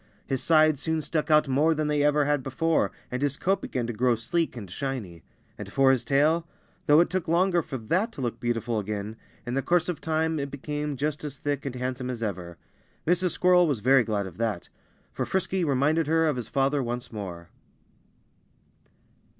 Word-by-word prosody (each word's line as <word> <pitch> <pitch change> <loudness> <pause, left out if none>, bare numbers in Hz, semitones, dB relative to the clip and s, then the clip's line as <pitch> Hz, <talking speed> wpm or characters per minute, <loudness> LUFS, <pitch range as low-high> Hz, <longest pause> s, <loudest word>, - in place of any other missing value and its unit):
His 135 -2 -1
sides 155 -3 +4
soon 160 -1 0
stuck 155 +1 -2
out 150 -1 +5
more 150 +5 +2
than 155 0 -1
they 150 -1 +1
ever 145 0 +3
had 145 -1 +1
before, 160 +6 0 0.2
and 125 +1 -3
his 140 0 0
coat 195 +2 0
began 125 -2 -3
to 120 - -3
grow 120 +2 +2
sleek 125 +6 -1
and 105 -4 -7
shiny. 105 - -5 0.4
And - - -6
as - - -13
for 135 -1 +5
his 130 -2 +1
tail 155 +6 +2 0.4
though 150 +2 +7
it 175 - +1
took 185 -2 -2
longer 175 +1 +3
for 135 - -6
that 180 - 0
to 140 - -7
look 120 -2 -3
beautiful 120 -2 -1
again, 105 +1 -4 0.3
in 120 - -4
the 135 - +1
course 175 +3 +1
of 175 - -4
time 160 0 0
it 140 0 -3
became 145 +1 -4
just 150 +2 -2
as 145 -2 -5
thick 145 -1 -3
and 130 - -5
handsome 125 0 -3
as 120 -2 -4
ever. 90 -5 -5 0.5
Mrs. 180 +2 +2
Squirrel 180 -1 +4
was 140 -7 0
very 130 +2 +5
glad 105 -3 -1
of 90 -3 -10
that. 110 -6 -2 0.4
For - - -2
Frisky 190 0 -1
reminded 150 +2 +2
her 160 +1 +3
of 150 -3 +1
his 120 -3 -5
father 140 +1 +1
once 120 0 -4
more. 90 -6 -7
140 Hz, 200 wpm, -26 LUFS, 120-160 Hz, 0.5 s, though